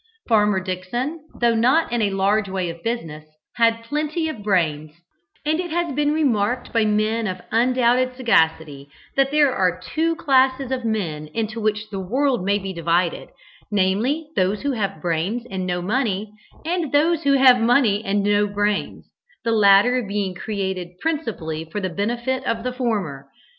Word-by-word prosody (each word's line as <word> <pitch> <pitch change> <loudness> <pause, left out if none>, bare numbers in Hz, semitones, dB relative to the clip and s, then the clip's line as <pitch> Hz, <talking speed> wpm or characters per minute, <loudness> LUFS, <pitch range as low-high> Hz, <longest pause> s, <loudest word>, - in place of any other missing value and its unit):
Farmer 210 -4 +3
Dickson, 190 - -4 0.2
though 235 -1 +3
not 250 +8 +2
in 240 -1 0
a 205 - +2
large 200 +1 +1
way 185 -2 -2
of 165 0 -13
business, 165 -10 -4 0.3
had 230 -1 +2
plenty 305 +5 -2
of 235 -9 -7
brains, 155 -7 0 0.5
and 310 +2 +1
it 355 -1 -3
has 340 -2 -1
been 295 +2 +1
remarked 250 -6 0
by 225 -2 +3
men 215 +1 +1
of 185 -1 -4
undoubted 250 +2 +2
sagacity 160 - +1 0.3
that 275 0 +3
there 290 -2 +3
are 180 -1 +1
two 325 - -1
classes 265 -2 +2
of 255 -2 -2
men 170 -9 -2
into 225 0 -2
which 215 0 -1
the 195 - -4
world 245 +4 0
may 200 +2 +2
be 195 -1 -5
divided, 170 +1 0 0.4
namely 215 +11 0
those 190 +5 0
who 285 - 0
have 200 - -3
brains 180 +8 -1
and 185 -1 -3
no 175 -1 -2
money, 210 -1 -1 0.3
and 335 -3 -1
those 315 +3 +3
who 280 -3 +2
have 260 -3 +6
money 230 -3 +3
and 200 -1 0
no 205 0 +2
brains, 205 0 -2 0.4
the 230 - +1
latter 215 +4 +5
being 200 -3 -3
created 190 -2 -4
principally 225 - -3
for 165 +6 -5
the 190 -2 -2
benefit 240 +7 -2
of 230 -1 -1
the 250 0 -3
former. 200 - -3
215 Hz, 165 wpm, -22 LUFS, 190-255 Hz, 0.5 s, have